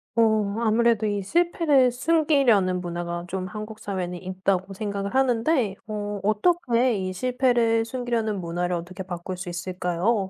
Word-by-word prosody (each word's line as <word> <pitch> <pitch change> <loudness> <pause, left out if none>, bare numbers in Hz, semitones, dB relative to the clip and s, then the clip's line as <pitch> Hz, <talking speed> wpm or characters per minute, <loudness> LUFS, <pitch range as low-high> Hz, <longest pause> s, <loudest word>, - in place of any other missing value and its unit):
어 215 -3 +2
아무래도 230 -1 +2
이 205 -1 -1
실패를 310 - +3
숨기려는 250 - +2
문화가 175 0 -4
좀 185 0 -3
한국 215 +2 -7
사회는 180 -3 -4
있다고 185 0 -1
생각을 200 +1 -4
하는데 245 -3 +2
어 205 -1 -4
어떻게 240 - +2
이 185 -1 -3
실패를 240 0 +2
숨기려는 230 -5 -2
문화를 175 +1 -2
어떻게 180 +3 -6
바꿀 180 0 -6
수 180 +1 -7
있을까요? 180 +4 -1
210 Hz, 325 characters per minute, -25 LUFS, 185-240 Hz, -, 실패를